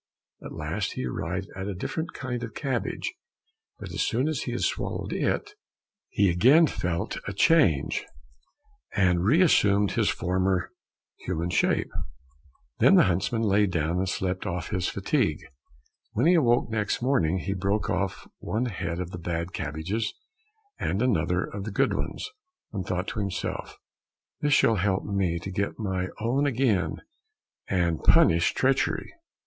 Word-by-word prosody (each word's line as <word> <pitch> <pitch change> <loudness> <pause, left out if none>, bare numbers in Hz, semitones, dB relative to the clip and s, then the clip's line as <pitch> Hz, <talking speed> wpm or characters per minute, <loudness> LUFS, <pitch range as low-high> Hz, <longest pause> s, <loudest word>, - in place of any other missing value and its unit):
At - - -8
last - - -3
he - - -3
arrived 90 +9 -3
at 95 0 -4
a 100 - -3
different 160 - -4
kind 125 -2 -4
of 115 -3 -6
cabbage, 130 -5 -2 0.6
but - - -8
as - - -2
soon 125 +6 +1
as 155 -4 -1
he 120 - -3
had 120 - -3
swallowed - - -2
it, - - -1 0.6
he 100 - +2
again 130 - +6
felt 90 - -2
a 100 - -3
change, 100 - +3 0.9
and 90 -3 +3
reassumed 105 - +4
his - - +1
former 90 0 0 0.5
human 85 -1 -3
shape. - - +1 0.9
Then - - +6
the - - +7
huntsman 95 +6 0
lay 105 0 +3
down 85 0 0
and 95 0 0
slept 95 +1 -2
off 90 -2 -3
his 90 -3 0
fatigue. 100 - 0 0.7
When - - +1
he 175 - +6
awoke 120 -8 +3
next 110 +1 -1
morning, 95 - +2
he 95 +2 -2
broke 100 +2 -1
off 95 -1 -2
one 115 +4 -1
head 85 -6 -3
of 90 -1 -4
the 90 - -6
bad 85 +1 -3
cabbages 90 +10 -3 0.6
and 95 - -1
another 90 -6 +1
of 100 -1 -6
the 110 - -5
good - - +2
ones, - - -3 0.5
and 95 -3 -2
thought 90 +2 -2
to - - -4
himself, 100 -3 -4 0.6
"This 145 -1 +2
shall 115 -4 +4
help 95 0 +1
me 95 -4 0
to 90 +3 -6
get 100 +1 -2
my 95 -4 -2
own 130 +6 +1
again 120 -8 0 0.6
and 85 -4 0
punish 85 0 +5
treachery." 135 +1 +1
95 Hz, 155 wpm, -27 LUFS, 90-115 Hz, 0.9 s, the